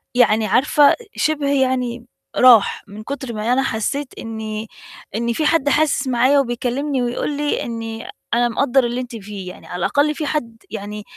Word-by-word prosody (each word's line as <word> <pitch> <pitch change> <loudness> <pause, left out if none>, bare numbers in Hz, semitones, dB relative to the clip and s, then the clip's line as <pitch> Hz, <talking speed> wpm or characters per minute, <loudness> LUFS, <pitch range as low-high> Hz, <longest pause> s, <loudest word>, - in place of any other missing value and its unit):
يعني 220 -3 +4
عارفة 285 +4 +4 0.2
شِبْه 300 -2 0
يعني 250 -2 -1 0.3
راح 245 -5 +5
من 210 +2 -10
كُتْر 265 -2 -5
ما 220 +3 0
أنا 270 - +2
حسيت 260 +6 -2
إن 220 -1 -5 0.5
إن 235 +1 0
فيه 305 +5 -1
حد 320 -4 +3
حاسس 295 -2 +2
معايا 255 +3 +3
وبيكلّمني 260 +2 -1
ويقول 245 +4 -2
لي 295 0 -1
إني 225 -1 -5 0.3
أنا 240 0 +3
مقدّر 265 +2 +2
اللي 240 +1 -1
أنتِ 245 -1 -8
فيه، 200 -3 -7
يعني - - -12
على - - -7
الأقل 290 - +1
فيه 310 - -3
حد 235 -7 -3
يعني، 210 -1 -6
245 Hz, 165 wpm, -20 LUFS, 225-280 Hz, 0.5 s, راح